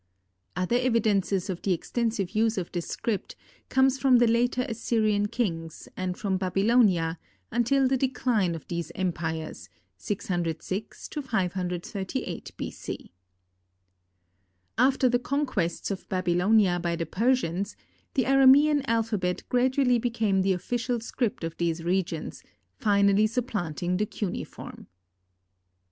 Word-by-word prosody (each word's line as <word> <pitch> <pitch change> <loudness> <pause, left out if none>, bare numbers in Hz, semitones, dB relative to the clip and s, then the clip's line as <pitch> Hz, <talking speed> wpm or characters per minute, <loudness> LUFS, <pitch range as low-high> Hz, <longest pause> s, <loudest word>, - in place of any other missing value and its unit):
Other 185 +7 +1
evidences 210 -6 +1
of 180 -2 -4
the 195 - +1
extensive 220 +1 -2
use 220 0 +1
of 180 -2 -3
this 175 -2 -3
script 215 -5 -3 0.3
comes 265 0 +3
from 260 -2 +5
the 240 - +5
later 245 +2 +2
Assyrian 215 -3 +1
kings, 165 -9 -3
and 185 -1 -3
from 195 -3 -1
Babylonia, 190 -3 +2 0.3
until 260 +3 +2
the 265 +1 +2
decline 245 -8 +1
of 160 - -9
these 170 -2 -4
empires, 165 -3 -3 0.3
606 180 - -3
to 300 - -4
538 185 -4 -3
B. - - -4
C. - - -8 1.6
After 260 +1 +3
the 245 0 +2
conquests 245 - -1
of 195 - -6
Babylonia 185 +1 +3
by 170 -1 -1
the 165 0 -2
Persians, 200 - 0 0.4
the 265 - +3
Aramean 270 +3 +6
alphabet 215 -6 0
gradually 250 0 +3
became 225 -5 +1
the 190 0 +2
official 240 +6 -2
script 235 -1 -2
of 165 0 -4
these 165 -1 -1
regions, 175 -2 -2 0.4
finally 200 0 +4
supplanting 180 - -2
the 210 +2 0
cuneiform. 200 -4 -6
205 Hz, 120 wpm, -27 LUFS, 180-245 Hz, 1.6 s, Aramean